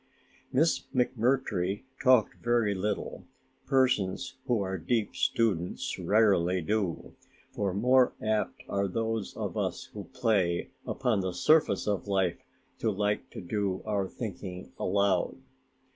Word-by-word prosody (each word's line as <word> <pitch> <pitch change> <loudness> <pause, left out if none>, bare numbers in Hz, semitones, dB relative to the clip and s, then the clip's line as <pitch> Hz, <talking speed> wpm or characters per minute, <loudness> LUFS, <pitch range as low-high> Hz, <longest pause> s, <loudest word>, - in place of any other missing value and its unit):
Miss 155 +5 +3 0.2
McMurtry 120 -6 +1 0.2
talked 130 -4 +4
very 120 -3 +2
little 100 +1 -3 0.4
persons 125 -9 +1
who 120 -3 +2
are 95 -1 -2
deep 110 +4 -1
students 95 -7 0
rarely 95 -4 +3
do; 95 0 -2 0.4
far 100 -2 -1
more 125 +4 +4
apt 110 -1 -1
are 100 0 0
those 110 +1 -2
of - - -3
us - - -3
who 105 -2 -7
play 100 -8 0 0.2
upon 125 -6 0
the 95 -1 -2
surface 150 - +3
of 100 -1 -1
life 95 -3 +1 0.4
to 110 - +1
like 105 0 -1
to - - -8
do 95 0 -2
our 100 -3 0
thinking 95 -4 -7
aloud. 100 +1 +1
105 Hz, 125 wpm, -29 LUFS, 95-115 Hz, 0.4 s, talked